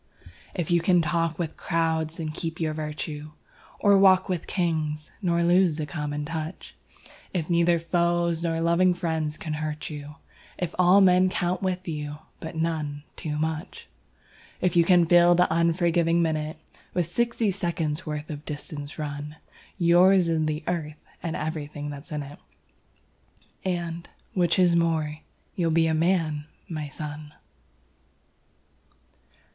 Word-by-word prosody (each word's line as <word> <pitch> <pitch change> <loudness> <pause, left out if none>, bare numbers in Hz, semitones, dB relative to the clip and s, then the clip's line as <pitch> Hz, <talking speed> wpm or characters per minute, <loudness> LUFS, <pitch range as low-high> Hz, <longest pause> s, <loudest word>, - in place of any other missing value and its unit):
If 175 -2 -2
you 170 -1 +4
can 175 0 +4
talk 165 -1 0
with 165 -3 -4
crowds 160 -1 -1
and 155 -2 -3
keep 165 +1 -4
your 160 -2 0
virtue, 150 0 -5 0.4
Or 200 -1 +5
walk 190 -1 +6
with 180 -4 -3
Kings 155 -4 -1
nor 170 -3 +1
lose 175 -2 +4
the 155 - -2
common 150 -1 -4
touch; 160 +2 -6 0.6
If 170 -1 -1
neither 170 0 +4
foes 170 0 +1
nor 165 -1 0
loving 175 +2 +3
friends 160 -3 -2
can 155 - -4
hurt 155 0 -4
you, 150 0 -8 0.4
If 180 - -3
all 180 +3 +6
men 185 0 +5
count 180 0 -1
with 185 -1 -2
you, 150 -2 -4 0.2
but 160 - -7
none 155 -3 -2
too 150 -3 -4
much; 160 +2 -3 0.7
If 180 - +1
you 170 - +6
can 175 0 +5
fill 175 +1 +6
the 180 +1 +5
unforgiving 170 0 +2
minute 155 -1 -1 0.4
With 175 -2 +2
sixty 230 +4 0
seconds' 170 -4 -2
worth 150 0 -5
of 150 -1 -7
distance 145 -1 -7
run, 150 0 -5 0.4
Yours 180 +1 +5
is 160 -1 +1
the 155 0 -2
Earth 155 -4 -3 0.2
and 165 -1 -3
everything 150 -2 -4
that's 145 +3 -9
in 150 -1 -2
it, 140 +1 -11 1.2
And 170 -2 -3 0.2
which 175 -3 +2
is 180 -2 +4
more 160 -3 +1 0.4
you'll 170 -3 +1
be 165 0 +3
a 160 - +1
Man, 160 -3 +1 0.2
my 155 -3 -4
son! 150 +1 -7
165 Hz, 145 wpm, -26 LUFS, 155-175 Hz, 1.2 s, walk